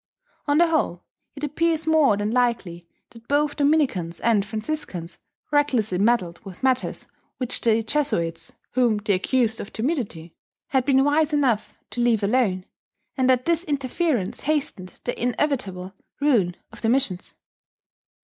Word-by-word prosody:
On 290 0 +3
the 345 - +6
whole, 285 - 0 0.3
it 280 - -9
appears 320 +2 0
more 310 -9 +4
than 205 +1 -1
likely 230 -9 0 0.2
that 230 0 -16
both 290 +1 +1
Dominicans 275 - +1
and 220 -3 +2
Franciscans 215 - -5 0.3
recklessly 250 -10 +1
meddled 205 -5 +1
with 195 0 -11
matters 260 -1 0 0.3
which 255 -1 -1
the 225 -1 +3
Jesuits 170 - -1 0.2
(whom 245 -4 +2
they 205 0 0
accused 225 +4 +1
of - - -9
timidity) 220 - -3 0.4
had 265 -2 +1
been 270 -1 +4
wise 300 +2 +2
enough 260 -7 +1 0.2
to 240 - -2
leave 230 -3 +2
alone, 200 -4 +1 0.5
and 260 -1 +2
that 255 -1 +3
this 335 0 +1
interference 280 - -1
hastened 275 -11 -2
the 245 - -4
inevitable 230 -8 -1 0.3
ruin 230 -12 +2 0.2
of - - -13
the 225 - +1
missions. 235 -8 0
245 Hz, 140 wpm, -24 LUFS, 200-290 Hz, 0.5 s, the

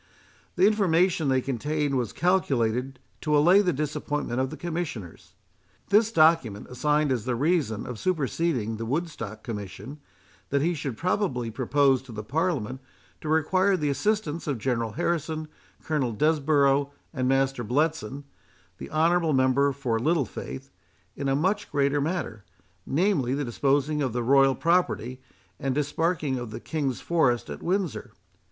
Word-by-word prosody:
The 180 - +4
information 180 -6 +3
they 130 -1 +2
contained 145 +3 -1
was 120 -6 -1
calculated 135 -8 0 0.2
to 150 -1 +2
allay 175 +7 +6
the 180 -3 +1
disappointment 145 -3 -2
of 130 0 0
the 155 - -8
Commissioners. 160 - -6 0.5
This 210 +2 +4
document 155 - +3
assigned 150 +3 +1
as 120 -4 -1
the 125 -1 0
reason 140 - 0
of 125 -3 -6
superseding 150 - -1
the 115 - -4
Woodstock 135 - -4
Commission, 110 +3 -7 0.5
that 140 0 +1
he 175 +2 +2
should 135 -7 -4
probably 150 - -1
propose 135 +2 +2
to 130 -2 -13
the 105 -1 -6
Parliament 130 - -1 0.4
to 155 - -5
require 185 +5 +2
the 150 -3 0
assistance 165 +1 -1
of 140 -4 -1
General 115 -2 -1
Harrison, 155 +2 -2 0.4
Colonel 140 -7 -1
Desborough, 140 0 +2 0.2
and 130 -3 -1
Master 135 -2 +1
Bletson, 145 +3 -1 0.6
the - - -7
honourable 165 +1 +2
member 130 +2 +3
for 125 -4 -2
Littlefaith, 135 - -2 0.4
in 140 - -3
a 135 - +2
much 185 +8 0
greater 140 0 +1
matter, 145 - -3 0.4
namely, 140 -5 +1
the 145 0 -2
disposing 140 +4 +1
of 130 -5 -1
the 120 0 -1
royal 135 +1 +4
property, 165 -7 0 0.4
and 135 -1 -1
disparking 150 -1 0
of 120 -2 -6
the 110 - -7
King's 140 -6 -3
forest 125 - +1
at 70 - -7
Windsor. 175 - -2
140 Hz, 145 wpm, -26 LUFS, 125-160 Hz, 0.6 s, allay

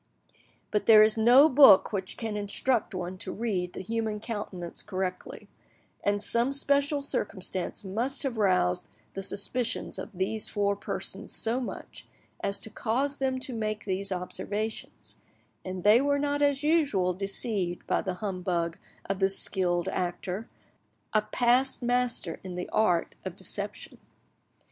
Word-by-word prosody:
But 210 - 0
there 215 -1 +9
is 215 0 +4
no 245 +6 +7
book 265 -9 +7
which 190 -2 -3
can 220 -2 -3
instruct 210 +2 -1
one 180 +1 -5
to - - -4
read 190 -6 -2
the - - -6
human 220 +1 -2
countenance 205 -6 -5
correctly; 185 -2 -5 0.6
and 205 0 +1
some 235 +5 +1
special 280 +1 +2
circumstance 190 -7 -2
must 240 +8 -1
have 265 -4 -2
roused 185 - +1 0.2
the 195 - -4
suspicions 220 +5 -2
of - - -6
these 195 +4 -1
four 200 -1 0
persons - - -5
so 230 +3 0
much 255 - -7 0.3
as 200 0 0
to 220 - -6
cause 270 +7 -1
them 260 -1 -1
to 265 -2 -3
make 215 -2 -3
these 195 0 -2
observations, 205 +4 -4 0.5
and 185 -1 -6
they 215 +4 +6
were 285 0 +2
not 290 0 -1
as 285 -1 +2
usual 285 - +2
deceived 195 -1 -1
by - - +1
the 185 -1 -3
humbug 180 -4 -2 0.3
of 195 0 -2
this 195 0 +2
skilled 175 -2 0
actor, 185 +3 -3 0.7
a 215 - +4
past 245 +4 +2
master 245 -8 0
in 185 -2 -6
the 180 - -4
art 180 -6 +1
of - - -6
deception. - - -5
210 Hz, 145 wpm, -28 LUFS, 185-245 Hz, 0.7 s, there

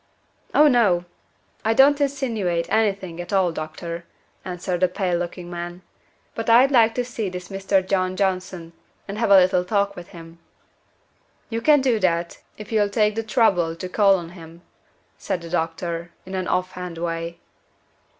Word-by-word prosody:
"Oh, 300 - +7
no. 205 -10 +3 0.6
I 225 +1 +1
don't 285 +3 +5
insinuate 230 -12 -1
any 220 -2 +3
thing 185 -3 -8
at 175 - -9
all, 190 -3 +2
doctor," 165 +2 -6 0.4
answered 180 -1 -3
the 185 - +4
pale 180 -1 -1
looking 175 0 -5
man. 175 +1 -7 0.5
"But 225 0 -4
I'd 250 +4 +6
like 230 -3 +4
to 245 - -1
see 230 -5 -4
this 180 0 -8
Mr. 195 -1 0
John 185 -1 0
Johnson, 185 -3 -2 0.3
and 205 +1 -5
have 230 - +1
a 200 - +8
little 180 -1 +4
talk 200 +1 0
with 175 -1 -9
him." 165 -2 -13 1.1
"You 230 0 -2
can 295 +2 +5
do 250 -4 +2
that, 170 -3 0 0.2
if 210 +1 -10
you'll 210 -2 +2
take 210 0 +2
the 225 - -2
trouble 210 -8 +2
to 185 - -6
call 195 +1 +4
on 170 -2 -7
him," 170 -1 -13 0.6
said 180 - -3
the 170 -1 -9
doctor, 170 0 -2 0.2
in 190 - -9
an 185 -1 -2
off 185 0 0
hand 180 -2 -7
way. 165 0 -4
185 Hz, 170 wpm, -23 LUFS, 175-215 Hz, 1.1 s, a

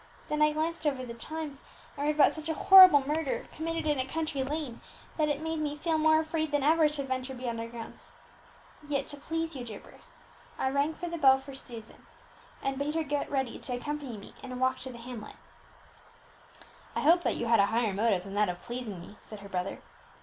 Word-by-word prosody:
Then 300 0 0
I 300 0 +5
glanced 315 +1 -1
over 265 -3 -1
the 235 - -7
Times, 295 +3 -5 0.3
and 285 +1 -2
read 300 - +2
about 295 - +6
such 315 0 -7
a 320 - 0
horrible 370 -9 +9
murder, 300 -1 -1
committed 330 +1 -3
in 295 -3 +1
a - - +2
country 310 +1 -2
lane, 280 -2 -4 0.3
that 305 -2 +1
it 295 +1 -1
made 320 0 -2
me 295 -1 -2
feel 320 +1 0
more 315 0 +5
than 310 -3 -1
ever 315 +2 +5
afraid 300 - +2
to 280 - -2
venture 260 0 -3
beyond 240 -2 -4
our 230 - -4
grounds. 230 -1 -9 0.8
Yet, 280 -2 0
to 290 - -6
please 325 +2 -3
you, 255 - -5
dear 220 -4 -7
Bruce, - - -15 0.4
I 265 - 0
rang 285 +3 +1
the 340 -1 -4
bell 265 -2 +7
for 270 +1 -10
Susan, 235 -4 -9 0.6
and 270 0 -1
bade 295 +2 -1
her 325 - +1
get 290 -1 -2
ready 265 -3 -2
to 250 - -3
accompany 280 -2 -4
me 200 - -12
in 265 - -8
a - - -5
walk 260 +1 +1
to 260 0 -7
the 240 - -10
hamlet." 235 -2 -8 1.6
"I - - 0
hope 340 +4 +5
that - - 0
you 235 - -2
had 230 0 +4
a 200 - +5
higher 225 -2 +1
motive 200 -2 +1
than 195 0 -8
that 205 -1 +2
of 175 0 -4
pleasing 235 -5 -6
me," 180 +4 -12
said 215 -2 -10
her 200 - -10
brother. 185 0 -3
280 Hz, 220 wpm, -30 LUFS, 240-310 Hz, 1.6 s, horrible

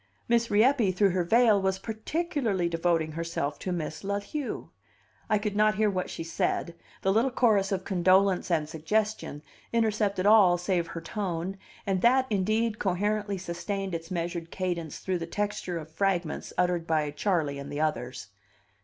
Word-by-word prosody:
Miss 235 0 +2
Rieppe, 225 0 +4
through 195 +1 +3
her 180 0 +1
veil, 220 +2 +4
was 190 0 +1
particularly 220 - -1
devoting 165 -1 0
herself 160 -3 -3
to 185 - -3
Miss 160 -2 -4
La 200 +1 -1
Lieu. 295 -4 -4 0.6
I 215 - +4
could 205 -1 -3
not 215 0 +4
hear 210 0 +2
what 185 -1 -2
she - - -5
said; 165 +1 -1 0.3
the 195 - +3
little 230 +5 +3
chorus 215 -6 +2
of 190 -1 -1
condolence 185 +1 +3
and 160 -3 +1
suggestion 165 0 -2 0.3
intercepted 215 -4 +1
all 205 -4 +6
save 175 -1 0
her 165 - -6
tone, 185 0 -3 0.3
and 190 -2 0
that, 255 +4 +4
indeed, 215 +3 +1
coherently 205 +2 0
sustained 190 +2 -4
its 165 0 -5
measured 170 -2 -3
cadence 175 -5 -3
through 185 -2 -2
the 165 - -5
texture 205 -2 -2
of 160 -1 -8
fragments 175 -2 -1
uttered 175 -2 +1
by 155 -2 +1
Charley 150 -3 0
and 140 - -7
the 145 - -2
others. 130 -9 -2
190 Hz, 160 wpm, -28 LUFS, 170-210 Hz, 0.6 s, all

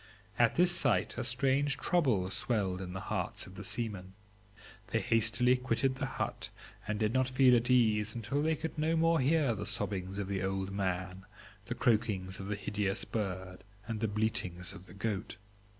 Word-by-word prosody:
At 120 -1 +4
this 175 +1 +5
sight 135 -9 +3
a - - -2
strange 135 +3 +1
trouble 125 - +1
swelled 100 -5 -1
in 90 -1 -6
the 95 - -4
hearts - - -2
of - - -12
the - - -8
seamen; 100 -5 -3 0.7
they 110 - 0
hastily 115 +3 +3
quitted 130 +1 0
the 135 -1 -2
hut, - - -4 0.4
and 105 0 -1
did 110 0 +1
not 130 -1 +2
feel 130 -1 +5
at 120 +1 +1
ease 110 -3 +3
until 120 +5 -1
they 160 +1 +2
could 160 +1 -5
no 160 +2 +2
more 165 0 +3
hear 140 -1 +3
the 105 -1 -5
sobbings 95 -3 -2
of 100 -2 -3
the 95 -1 -2
old 95 0 -2
man, 95 0 -3 0.4
the 120 - -3
croakings 105 -7 0
of 95 - -6
the 105 - -1
hideous 100 0 -1
bird, 95 -3 -4 0.2
and 115 -2 -3
the 110 - 0
bleatings 100 -4 -2
of 95 -1 -11
the 90 - -13
goat. 100 -1 -3
110 Hz, 180 wpm, -32 LUFS, 95-130 Hz, 0.7 s, this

